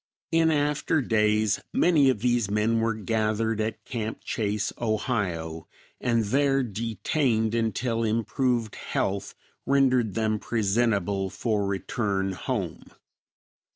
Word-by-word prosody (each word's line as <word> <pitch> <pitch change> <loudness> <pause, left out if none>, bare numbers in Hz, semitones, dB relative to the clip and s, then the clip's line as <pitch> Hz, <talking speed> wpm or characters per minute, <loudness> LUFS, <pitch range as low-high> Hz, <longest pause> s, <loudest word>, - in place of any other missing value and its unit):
In 165 0 +4
after 150 +1 +1
days 105 -4 +2
many 155 -6 +5
of 125 -6 0
these 120 -4 +1
men 105 +2 +1
were 115 -1 +1
gathered 110 0 0
at 110 +1 -4
Camp 115 -3 -4
Chase, 105 -1 -1
Ohio, 100 -9 -2 0.3
and 115 -2 +1
there 135 +5 +2
detained 115 - 0
until 115 0 0
improved 115 +1 0
health 100 0 -2 0.3
rendered 130 -6 +2
them 110 -1 0
presentable 100 -3 0
for 100 +1 -1
return 95 0 -1
home. 90 - -4
110 Hz, 110 wpm, -26 LUFS, 105-120 Hz, 0.3 s, many